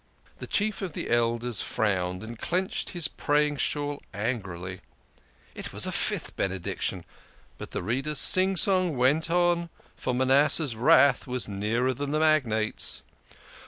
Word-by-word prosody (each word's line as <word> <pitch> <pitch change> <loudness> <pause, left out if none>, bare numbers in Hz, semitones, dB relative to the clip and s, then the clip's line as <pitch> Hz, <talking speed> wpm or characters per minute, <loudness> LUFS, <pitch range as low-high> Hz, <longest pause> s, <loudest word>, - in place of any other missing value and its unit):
The - - -7
Chief 215 0 -1
of 185 -5 -5
the - - -5
Elders 120 0 0
frowned 90 -3 -2
and 115 +1 -9
clenched 185 +2 -2
his 175 -4 -1
praying 145 0 0
shawl 145 +1 -2
angrily. 95 -5 -4 0.7
It - - -7
was - - +2
a - - -2
fifth - - -2
Benediction! 95 -2 -3 0.5
But - - -8
the - - -5
Reader's 135 +9 -1
sing 190 +5 +6
song 185 -5 +2
went 145 +7 +2
on, 175 0 +1 0.3
for 125 - -3
Manas 130 +3 +4
seh's 145 -8 +2
wrath 140 +2 +4
was 125 -1 0
nearer 110 +6 -1
than 140 +3 -5
the 155 +1 0
magnate's. 130 -9 +1
130 Hz, 145 wpm, -26 LUFS, 110-155 Hz, 0.7 s, sing